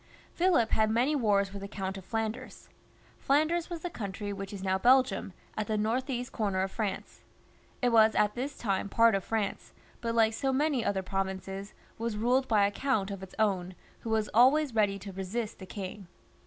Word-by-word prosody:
Philip 340 Hz, -11 st, +2 dB
had 220 Hz, 0 st, +3 dB
many 245 Hz, +7 st, +2 dB
wars 200 Hz, -6 st, +2 dB
with 200 Hz, -, -6 dB
the 200 Hz, -, -5 dB
Count 195 Hz, -1 st, -4 dB
of 195 Hz, -, -8 dB
Flanders. 225 Hz, +2 st, -4 dB, 0.5 s
Flanders 315 Hz, +5 st, +1 dB
was 340 Hz, -2 st, -5 dB
the 355 Hz, -, -3 dB
country 205 Hz, -, -5 dB
which 195 Hz, 0 st, -6 dB
is 195 Hz, -2 st, -7 dB
now 190 Hz, 0 st, +1 dB
Belgium, 250 Hz, -5 st, +3 dB, 0.2 s
at 215 Hz, -1 st, -2 dB
the 215 Hz, -, 0 dB
north 230 Hz, +6 st, 0 dB
east 245 Hz, -1 st, -3 dB
comer 200 Hz, -4 st, -1 dB
of 190 Hz, -, -3 dB
France. 205 Hz, -3 st, -4 dB, 0.6 s
It 245 Hz, -, +4 dB
was 220 Hz, -1 st, +5 dB
at 210 Hz, 0 st, +3 dB
that 270 Hz, +4 st, -4 dB
time 200 Hz, -3 st, -1 dB
part 230 Hz, +2 st, +5 dB
of 195 Hz, -1 st, 0 dB
France, 215 Hz, -1 st, -3 dB, 0.3 s
but 230 Hz, -1 st, -2 dB
like 225 Hz, -1 st, +4 dB
so 270 Hz, +4 st, 0 dB
many 275 Hz, -2 st, +1 dB
other 190 Hz, -3 st, 0 dB
provinces, 195 Hz, +1 st, -4 dB, 0.2 s
was 230 Hz, -2 st, -2 dB
ruled 250 Hz, +4 st, +2 dB
by 210 Hz, -3 st, +4 dB
a 200 Hz, -, +1 dB
count 210 Hz, -5 st, 0 dB
of 195 Hz, -1 st, -6 dB
its 190 Hz, -1 st, -10 dB
own, 185 Hz, -4 st, 0 dB, 0.2 s
who 230 Hz, -, -7 dB
was 220 Hz, -1 st, +1 dB
always 265 Hz, +4 st, +5 dB
ready 205 Hz, -3 st, +2 dB
to 200 Hz, 0 st, -8 dB
resist 205 Hz, +4 st, -4 dB
the 190 Hz, -, -9 dB
king. 190 Hz, 0 st, -7 dB
215 Hz, 195 wpm, -30 LUFS, 195-245 Hz, 0.6 s, was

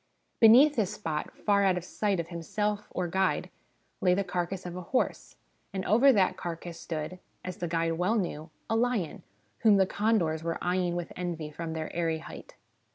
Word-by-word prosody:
Beneath 255 Hz, +6 st, +7 dB
this 210 Hz, -2 st, 0 dB
spot, 155 Hz, -6 st, -3 dB, 0.2 s
far 200 Hz, -1 st, +4 dB
out 190 Hz, -2 st, +3 dB
of 180 Hz, -, -4 dB
sight 200 Hz, 0 st, -1 dB
of 170 Hz, -, -4 dB
himself 205 Hz, +5 st, -2 dB
or 180 Hz, -1 st, -2 dB
guide, 190 Hz, +2 st, 0 dB, 0.5 s
lay 180 Hz, -1 st, +4 dB
the 200 Hz, -, +1 dB
carcass 180 Hz, 0 st, -3 dB
of 175 Hz, -1 st, -5 dB
a 180 Hz, -, -5 dB
horse, 255 Hz, +9 st, -1 dB, 0.4 s
and 190 Hz, -1 st, -3 dB
over 240 Hz, +8 st, +6 dB
that 195 Hz, -6 st, +3 dB
carcass 170 Hz, 0 st, -6 dB
stood, 160 Hz, +2 st, -5 dB, 0.3 s
as 185 Hz, -1 st, -5 dB
the 175 Hz, -, -3 dB
guide 165 Hz, 0 st, 0 dB
well 195 Hz, +6 st, +2 dB
knew, 165 Hz, -6 st, -2 dB, 0.2 s
a 225 Hz, -, 0 dB
lion, 225 Hz, -7 st, 0 dB, 0.4 s
whom 215 Hz, -3 st, +5 dB
the 190 Hz, -, +5 dB
condors 190 Hz, -6 st, +1 dB
were 165 Hz, 0 st, -2 dB
eyeing 180 Hz, -1 st, 0 dB
with 175 Hz, -1 st, -4 dB
envy 170 Hz, -4 st, -4 dB
from 165 Hz, +1 st, -5 dB
their 160 Hz, -1 st, -5 dB
airy 165 Hz, -2 st, 0 dB
height. 160 Hz, -, -11 dB
180 Hz, 185 wpm, -29 LUFS, 165-205 Hz, 0.5 s, Beneath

